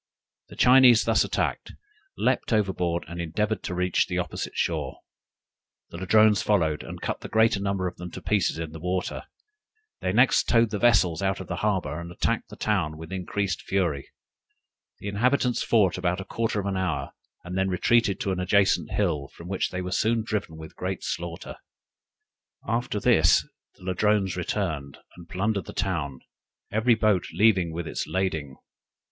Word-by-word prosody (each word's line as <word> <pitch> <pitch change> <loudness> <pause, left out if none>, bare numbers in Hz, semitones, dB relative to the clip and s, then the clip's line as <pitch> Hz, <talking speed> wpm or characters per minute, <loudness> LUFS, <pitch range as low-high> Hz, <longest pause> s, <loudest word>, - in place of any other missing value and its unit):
The - - -11
Chinese 125 -3 +6
thus - - +3
attacked, - - -2 0.4
leaped 130 0 0
overboard, 90 -5 0
and 85 +1 -5
endeavored 100 +5 -1
to 90 - -4
reach 90 0 +1
the 90 - -3
opposite 90 -3 -4
shore; - - -2 0.9
the 85 - -7
Ladrones 105 +2 +4
followed, 80 -8 +1
and - - -8
cut - - -3
the - - -8
greater 110 -2 +3
number 100 -1 -1
of 90 - -7
them 90 0 -7
to - - -6
pieces 100 -6 +1
in 80 -1 -5
the 80 - -9
water. 90 +2 -3 0.7
They 90 - -1
next 125 +6 +3
towed 115 -1 +4
the 105 - -2
vessels 100 -8 +3
out 95 0 0
of 95 - -6
the 90 - -5
harbor, 90 -7 -1
and 85 0 -8
attacked - - -1
the - - -10
town 85 -8 -1
with 80 +2 -10
increased 95 -1 -2
fury. 85 -8 -1 0.9
The - - -8
inhabitants 125 +4 +1
fought 100 -6 +2
about 90 0 0
a 95 - -6
quarter 115 -2 -1
of 100 - -4
an 100 -1 -1
hour, 95 0 -2 0.3
and 90 - -6
then 95 0 +1
retreated 100 +3 +2
to 95 - -1
an 95 - -2
adjacent 100 +2 +2
hill, 70 -2 -1
from 85 +5 -12
which 95 - -1
they 90 0 -4
were 90 - -5
soon 110 +3 +1
driven 105 -7 -3
with 80 -1 -10
great 95 0 -4
slaughter. 85 -1 -5 1.1
After 115 0 -1
this - - +4 0.3
the - - -19
Ladrones 95 0 +1
returned, 80 -7 -3 0.2
and 85 -1 -14
plundered 100 +2 -1
the - - -9
town, 80 -10 -2 0.5
every 115 +2 +3
boat 105 -5 +2
leaving 95 -1 +4
it - - -7
with 85 0 -3
lading. 80 -8 -2
95 Hz, 175 wpm, -26 LUFS, 85-105 Hz, 1.1 s, Chinese